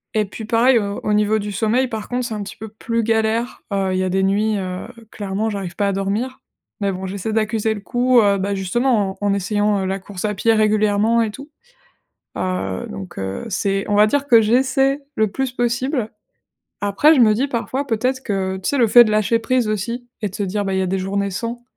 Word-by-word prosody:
Et 215 -1 +2
puis, 215 +3 -8
pareil, 235 +3 +4
au 200 -1 -3
au 210 - 0
niveau 210 +1 +2
du 205 0 -4
sommeil, 230 +5 +1
par 220 -3 -6
contre, 250 0 -1
c'est 235 - -4
un 210 -1 -4
petit 200 - -9
peu 220 - -7
plus 230 +2 -2
galère. 225 +2 0
Heu, 195 -1 0
il - - 0
y - - +1
a 185 - -1
des 190 +1 +1
nuits, 210 +2 +1
heu, 185 0 -5 0.2
clairement, 205 +2 -2
j'arrive 195 -4 -5
pas 200 -1 0
à 200 - 0
dormir. 205 +7 -2 0.4
Mais 200 - +1
bon, 190 0 -5
j'essaie 200 +3 -4
d'accuser 220 0 0
le 205 - -7
coup, 245 +1 +3
heu 200 -2 +3
bah, 200 +1 -1
justement 200 +1 0
en 205 - 0
en 200 - +2
essayant, 205 +1 0
heu, - - -2
la 195 +1 -2
course 190 -1 -8
à 210 - 0
pied 225 +3 +2
régulièrement 215 +1 +2
et 225 - 0
tout. 275 +6 -11 0.9
Heu, 95 - -2
donc 95 -2 -8
heu, 95 - -4
c'est 195 0 0
on 205 - +2
va 210 +1 +6
dire 285 +5 0
que 230 -4 +7
j'essaie 265 +5 +2 0.2
le 220 - +2
plus 265 +1 -2
possible. 245 0 -1 0.7
Après, 205 +11 +4
je 260 - +5
me 215 -2 +6
dis 255 +6 0
parfois, 270 +2 -3
peut-être 255 +3 0
que, 190 -3 -2
tu 190 - -3
sais 285 - 0
le 235 -3 +4
fait 240 +3 +8
de 215 - -1
lâcher 215 +2 +2
prise 250 0 0
aussi 235 +4 -3
et 210 - 0
de 190 - -10
se 205 - -2
dire: 200 +2 -2
«Bah, 195 - -1
il 190 - +1
y - - +1
a - - 0
des 190 +1 -1
journées 200 +1 -2
sans», 235 +5 -4
215 Hz, 235 wpm, -20 LUFS, 195-235 Hz, 0.9 s, fait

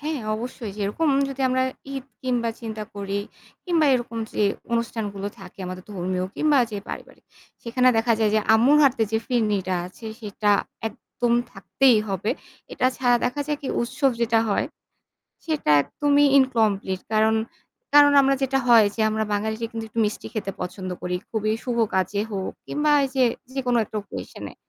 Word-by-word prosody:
হ্যাঁ, 300 -1 -3
অবশ্যই 230 -1 -6
যেরকম 210 +11 0 0.2
যদি 275 0 -7
আমরা 260 0 +2 0.3
ঈদ 270 -2 -5 0.2
কিংবা 245 -3 0
চিন্তা 220 -2 -5
করি 200 0 -3 0.5
কিংবা 335 -4 +2
এরকম 240 -2 -3
যে - - 0 0.3
অনুষ্ঠানগুলো 220 -4 -2
থাকে - - -13
আমাদের 185 0 -7
ধর্মীয় 185 -1 -2
কিংবা 300 -2 +3
যে 205 - -2
পারিবারিক, - - -9 0.4
সেখানে 250 +2 +2
দেখা 230 +1 +2
যায় 220 -2 +2
যে 215 - +4
আম্মুর 250 +7 +5
হাতে 265 -4 +3
যে 220 - +3
ফিরনিটা 210 -7 0
আছে 205 +5 -11
সেটা 210 -1 -1 0.4
একদম 240 +1 -3 0.2
থাকতেই 235 +4 +3
হবে। 195 +3 -1 0.4
এটা - - +1
ছাড়া 245 -2 +3
দেখা 250 +4 -1
যায় 300 -1 -1
কি 280 - -7
যে - - -2
উৎসব 265 +4 +1
যেটা 230 -1 +3
হয় 200 - +1 0.8
সেটা 310 - 0
একদমই 290 - +2
ইনকমপ্লিট 215 -8 +1
কারণ, 220 +1 +4 0.6
কারণ 290 0 +8
আমরা 275 0 +3
যেটা 270 0 +1
হয় 230 -3 +7
যে 225 - -1
আমরা 220 0 0
বাঙালিরা 220 +2 -2
কিন্তু 225 -1 -5
একটু 230 - -3
মিষ্টি 210 - -4
খেতে 210 -3 -3
পছন্দ 185 +1 -5
করি। 180 0 -2
খুবই 215 -1 -1
শুভ 245 -2 -2 0.2
কাজে 190 +2 0
হোক 190 -2 -3
কিংবা 300 +1 +1
এই 270 - -1
যে 260 - +4 0.3
যেকোনো 250 -3 +1
একটা 215 - -12
occasion 205 - -8
এ - - -29
230 Hz, 170 wpm, -24 LUFS, 205-265 Hz, 0.8 s, কারণ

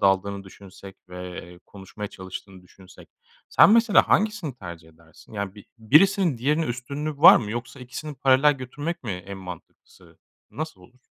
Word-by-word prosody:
daldığını 100 0 +1
düşünsek 95 0 -14
ve, 90 0 -8
eee, 90 0 -14
konuşmaya 100 +1 -9
çalıştığını 95 0 -10
düşünsek 90 +1 -18 0.4
sen - - +6
mesela 230 -1 +5
hangisini 210 - +1
tercih 85 -7 -10
edersin? 80 +4 -20
Yani, 100 -2 -5
bi 105 - -14
birisinin 160 - +3
diğerine 150 +7 +1
üstünlüğü 140 +5 -5
var 180 +6 +9
mı? 105 -3 -3
Yoksa 120 +4 -6
ikisini 130 +4 -8
paralel 135 +2 +4
götürmek 145 +6 -6
mi 110 - -4
en 95 +2 -8
mantıklısı, 90 -3 -13 0.3
nasıl 155 -11 -7
olur? 125 +8 -21
115 Hz, 150 wpm, -24 LUFS, 95-150 Hz, 0.4 s, var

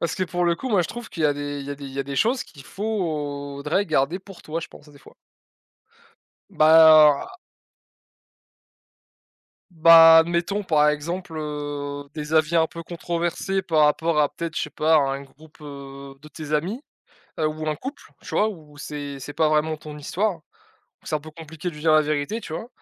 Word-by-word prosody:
Parce 170 - -2
que 185 - -1
pour 175 0 -2
le 170 -1 +2
coup, 260 +10 -6
moi 200 -6 +3
je - - -5
trouve 240 -1 -8
qu'il 160 - -3
a 145 - +4
des 145 0 -5
il 140 - -8
y 145 - -6
a - - -3
des 140 - -11
il 135 - -8
y 135 - -7
a - - +1
des 140 +1 -6
choses 245 - +1
qu'il 140 -4 -15
faudrait 150 -5 -3
garder 155 +2 0
pour 195 -1 -14
toi, 160 +2 -4
je - - -8
pense, 150 - -16
heu, - - -17
des 140 - -17
fois. - - -18 1.4
Bah, 155 -2 +7
heu - - -15 2.3
bah, 165 -1 +8
admettons, 170 +5 0
par 150 -5 +3
exemple, 165 +4 -5
heu, 145 -1 -5
des 150 0 -4
avis 160 +1 +3
un 160 -1 +4
peu 165 +1 -9
controversés 175 +3 -3
par 155 -4 +3
rapport 160 +1 +1
à 145 - +3
peut-être, 170 -1 -6
je - - 0
sais - - -5
pas, 160 +1 +1
à - - +6
un 135 -1 -1
groupe, 150 +3 -19
heu, 140 -1 -10
de 150 - -13
tes 155 -1 -8
amis, 185 - -1 0.6
heu, 155 - +2
ou 155 0 -5
un 155 - -1
couple, 265 - -8 0.2
tu - - -12
vois? 215 - +2
Où 155 -7 -12
c'est 145 -1 -7
c'est 145 +2 -8
pas 160 - +2
vraiment 155 +1 +1
ton 150 0 -10
histoire, 190 +7 -1 0.7
où - - -23
c'est - - -2
un 150 - -1
peu 155 - -11
compliqué 160 +2 -8
de - - -14
lui 150 - -10
dire 160 0 +3
la 155 0 +5
vérité, 150 +9 -2
tu - - -8
vois? 225 +8 -6
155 Hz, 215 wpm, -23 LUFS, 145-170 Hz, 2.3 s, bah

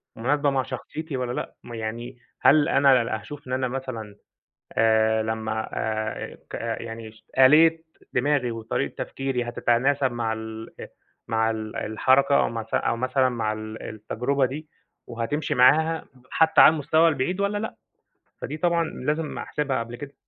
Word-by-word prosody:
مناسبة 145 +5 +1
مع 135 -1 +1
شخصيتي 155 +2 -6
والّا 125 -1 -2
لأ، - - -5
م 120 - -10
يعني 115 +3 -5 0.2
هل 150 +1 +5
أنا 130 -5 +4
هاشوف 145 +1 -10
إن 125 - -4
أنا 130 0 0
مثلًا 120 -5 -6 0.6
آآ 110 0 +3
لمّا 110 0 -3
آآ 110 0 -3
ك - - -14
يعني 115 -1 -5
ش 110 - -22 0.2
آلية 160 +4 +6 0.3
دماغي 130 -2 +1
وطريقة 115 -1 -3
تفكيري 135 -3 -3
حتتناسب 130 +3 +1
مع 115 -2 -1
ال 110 0 -7 0.6
مع 110 0 +1
ال 110 -1 -5
الحركة 130 +6 +3
أو - - +2
معث 115 -1 -6
أو 115 - +1
مثلًا 130 +1 +2
مع 115 -3 -1
ال 110 0 -7
التجربة 125 +6 -1
دي، 150 +4 -6 0.4
وهتمشي 120 +6 -2
معاها 160 +6 +4 0.3
حتى 160 0 +5
على 155 - +8
المستوى 160 +2 +3
البعيد 160 +6 -1
والّا 200 +1 0
لأ. 220 +2 -4 0.7
فدي 150 +5 -4
طبعًا 170 0 +1
لازم 150 +1 -3
أحسبها 145 -5 -2
قبل 115 +1 -6
كده. 140 +2 -9
125 Hz, 150 wpm, -25 LUFS, 115-145 Hz, 0.7 s, على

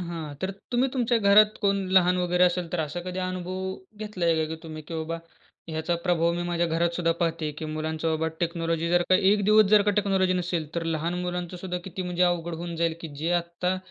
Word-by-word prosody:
हां. 165 -4 -5
तर 190 - 0 0.2
तुम्ही 250 +2 +3
तुमच्या 245 -2 +1
घरात 210 +1 +5
कोण 200 -1 +2 0.2
लहान 180 -1 +5
वगैरे 180 0 +3
असेल 180 -1 +1
तर 175 - 0
असा 155 +3 -3
कधी 185 +1 -5
अनुभव 185 +1 -3 0.2
घेतला 210 -4 -4
आहे, 165 -1 +4
का 160 - +1
की - - -8
तुम्ही 155 -1 -8
की 165 - -5
बाबा, 160 +1 -3 0.5
ह्याचा 160 +2 -1
प्रभाव 170 -1 +2
मी 175 - -2
माझ्या 170 0 +1
घरात 165 +1 +1
सुद्धा 165 -2 +2
पाहते, 165 -2 0
की 155 +2 -7
मुलांचं 155 +1 -2
बाबा 160 0 0
टेक्नॉलॉजी 165 -1 -1
जर 175 0 +4
का - - +7 0.2
1 205 -1 +2
दिवस 215 +1 +6
जर 210 -1 +7
का 205 - +2
टेक्नॉलॉजी 195 -2 +2
नसेल, 175 -3 -1
तर 170 - -1
लहान 165 +1 -1
मुलांचं 180 0 -4
सुद्धा 180 0 -4
किती 190 0 -5
म्हणजे 180 0 -1
अवघड 170 -1 +1
होऊन 170 0 -5
जाईल, 165 -1 +1
की 165 - -6
जे 160 +4 -2
आत्ता 175 +2 -2
175 Hz, 220 wpm, -26 LUFS, 165-185 Hz, 0.5 s, का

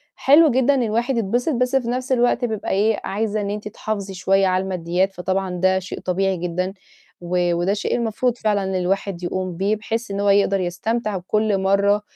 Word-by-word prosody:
حلو 295 +2 +5
جدًا 260 +3 +3
إن 260 - +1
الواحد 235 +3 0
يتبسط، 240 +8 0
بس 250 +2 0
في 250 -3 +1
نَفْس 255 +2 -3
الوقت 245 0 +2
بيبقى 220 -3 -4
إيه، 210 +2 +2
عايزة 215 +1 -2
إن 200 - -3
أنتِ 210 0 -4
تحافظي 200 -2 -4
شوية 195 +1 +2
على 185 0 +1
الماديّات، 185 +1 -1
فطبعًا 190 +1 -2
ده 190 0 +3
شيء 185 - -7
طبيعي 190 +1 0
جدًا، 180 +2 -2 0.5
و 175 0 0
وده 175 +4 +1
شيء 210 - -1
المفروض 235 +1 -1
فعلًا 210 -3 0
إن 190 0 -2
الواحد 185 0 -1
يقوم 185 -1 -3
بيه 200 +3 +1
بحيث 225 +1 -4
إن 200 - -3
هو 200 0 +2
يقدر 200 -1 +3
يستمتع 210 +4 -2
كل 215 -2 +1
مرّة 200 +2 +2
200 Hz, 195 wpm, -21 LUFS, 190-225 Hz, 0.5 s, حلو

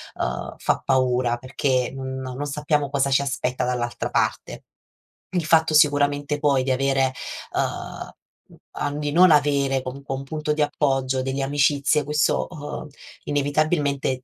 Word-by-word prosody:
uhm, - - -3
fa - - 0
paura 125 -2 +1
perché 130 0 -1
non 130 0 -5
non 130 +2 -5
sappiamo 145 0 -1
cosa 140 -1 +1
ci 135 - +4
aspetta 130 -2 -2
dall'altra 120 -1 -2
parte. - - -1 0.7
Il 175 -3 -1
fatto 160 0 +3
sicuramente, 145 -1 +3
poi, 140 -3 +2
di 130 - -1
avere 135 0 +1 0.4
uhm, - - -3 0.9
di 145 -1 -2
non 180 +3 +6
avere 140 -2 +3
comunque 135 +1 -6
un 135 - -6
punto 150 +2 -2
di 150 - -1
appoggio, 135 -3 0
delle 135 +1 -2
amicizie 145 +1 +2
questo, 150 +1 +1
uhm, 150 -1 -7 0.4
inevitabilmente 145 -2 0
140 Hz, 135 wpm, -23 LUFS, 130-150 Hz, 0.9 s, non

